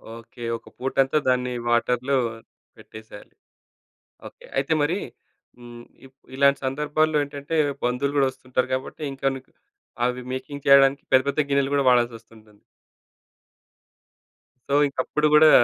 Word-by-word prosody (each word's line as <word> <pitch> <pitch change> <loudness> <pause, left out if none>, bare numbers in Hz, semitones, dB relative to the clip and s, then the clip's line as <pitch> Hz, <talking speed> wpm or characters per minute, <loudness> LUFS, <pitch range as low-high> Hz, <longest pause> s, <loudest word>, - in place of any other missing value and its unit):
Okay. 115 +1 -12
ఒక - - -18
పూట 135 +1 -4
అంతా 135 +3 -1
దాన్ని 125 0 0 0.2
వాటర్‌లో 125 +3 +1 0.6
పెట్టేసేయాలి. 110 -1 -13 0.9
ఓకే. - - -16
అయితే 160 - +1
మరి 165 +6 0 0.6
హ్మ్, 120 0 -12 0.2
ఇప్ 135 +1 -19 0.2
ఇలాంటి 140 0 +3
సందర్భాల్లో 150 +3 0
ఏంటంటే, 145 +2 -6 0.3
బంధువులు 130 +3 -1
కూడా 135 -1 +4
వస్తుంటారు 130 0 -3
కాబట్టి, 130 +4 -5
ఇంకా 135 0 -3
నీకు 130 - -12 0.5
అవి 125 0 -2
మేకింగ్ 140 +2 -7
చేయడానికి 140 0 +5
పెద్ద, 130 0 +5
పెద్ద 140 - -2
గిన్నెలు 140 0 +1
కూడా 140 -2 +1
వాడాల్సొస్తుంటుంది. 115 -3 -2 2.1
సో, - - -1
ఇంక 140 - -13
అప్పుడు 150 0 +1
గూడా 155 0 +7
135 Hz, 125 wpm, -23 LUFS, 125-140 Hz, 2.1 s, గూడా